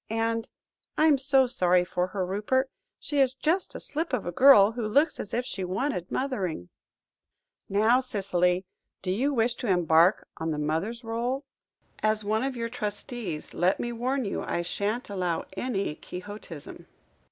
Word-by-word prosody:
And 225 0 -1 0.5
I'm 305 -3 +5
so 270 0 +4
sorry 180 -7 +2
for 180 0 -1
her, 185 0 -2
Rupert; 215 +8 0 0.3
she 290 - -2
is 260 -1 +3
just 325 +7 0
a - - -4
slip 315 0 -3
of 245 - 0
a 175 - -2
girl, 220 -1 +7
who 240 +1 -5
looks 290 +8 +2
as 200 - -5
if 245 +1 -1
she 190 - -4
wanted 185 - -2
mothering." 190 - -2 1.0
"Now, 220 +5 +4
Cicely, 190 -7 0 0.4
do 185 - -1
you 255 +10 +1
wish 240 -2 +2
to 245 - -4
embark 175 0 +4
on 160 0 -3
the 155 - -1
mother's 165 +11 -2
rôle? 240 +4 -2 0.6
As 215 0 +1
one 215 +3 0
of 270 -1 -2
your 230 -1 -2
trustees, 210 - -5
let 180 +3 +2
me 240 - -2
warn 250 +2 -1
you 200 - -2
I 175 - -2
shan't 205 +7 -2
allow 180 -4 -2
any 200 -7 -2
quixotism." 180 -3 -9
215 Hz, 165 wpm, -27 LUFS, 180-255 Hz, 1.0 s, girl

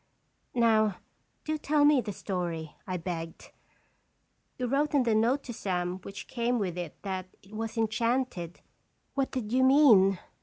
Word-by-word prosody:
"Now, 220 -4 +3 0.5
do 310 0 -2
tell 295 0 +3
me 290 -3 +5
the 210 - -5
story," 175 -5 -4
I 185 -1 -2
begged. 165 -1 -6 0.5
" - - -45
You 250 - -2
wrote 285 +4 +1
in 275 - +4
the 230 -2 +2
note 235 +6 +2
to 240 - -7
Sam 180 -3 -2
which 195 +1 -9
came 245 0 0
with 190 -6 -2
it 175 -4 -6
that 190 -2 -4 0.2
it 195 +3 -17
was 225 +1 -4
enchanted. 225 -5 -1 0.5
What 275 -1 0
did 235 -5 -4
you 260 +1 +3
mean?" 240 -9 +6
220 Hz, 160 wpm, -29 LUFS, 185-255 Hz, 0.5 s, mean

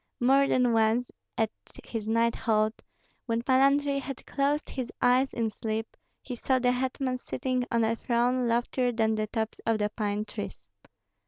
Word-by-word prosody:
More 270 +3 +4
than 250 -3 +3
once, 225 +2 +2 0.3
at 220 -1 +1 0.3
his 220 -2 -5
night 230 +1 +2
halt, 215 0 0 0.5
when 230 0 0
Pan 260 +1 +4
Andrei 280 0 +3
had 275 -1 -7
closed 285 +2 0
his 255 -3 -4
eyes 255 +2 +3
in 225 -2 -1
sleep, 220 +1 -4 0.3
he 255 - -6
saw 260 +2 +1
the 250 -1 +2
hetman 255 0 -1
sitting 255 -1 -2
on 230 -1 +2
a 225 +1 +1
throne 245 +2 +1
loftier 240 +2 +1
than 220 -1 +1
the 215 0 -1
tops 220 0 -3
of 225 -1 +1
the 210 0 -1
pine 210 -1 -2
trees. - - -8
240 Hz, 170 wpm, -28 LUFS, 225-255 Hz, 0.5 s, More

